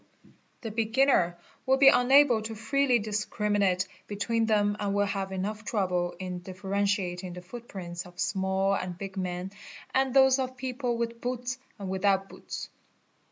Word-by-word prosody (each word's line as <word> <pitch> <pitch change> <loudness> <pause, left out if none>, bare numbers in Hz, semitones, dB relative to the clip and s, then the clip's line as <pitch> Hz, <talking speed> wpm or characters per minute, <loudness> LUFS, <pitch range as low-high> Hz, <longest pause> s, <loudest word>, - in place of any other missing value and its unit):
The 225 - -5
beginner 225 -5 +2 0.3
will 265 +1 +4
be 275 0 +8
unable 260 -2 +5
to 220 +1 -5
freely 255 +3 +2
discriminate 205 -3 0 0.2
between 225 +2 0
hem 205 -2 +2
and 200 -1 -1
will 205 0 +3
have 195 -1 -3
enough 205 +3 -3
trouble 180 -5 -1
in 180 -1 -5
differentiating 190 -1 -2
the 180 0 -9
footprints 180 -4 -7
of 180 - -16
inall 195 0 +1
and 180 -2 -5
big 195 +1 -7
men 180 0 -3 0.4
and 265 0 +2
those 265 0 +5
of 255 0 -3
people 250 -1 -2
with 235 0 -3
boots 250 +1 -3 0.2
and 200 -3 -6
without 195 +1 +1
boots. - - -7
205 Hz, 150 wpm, -28 LUFS, 190-240 Hz, 0.4 s, be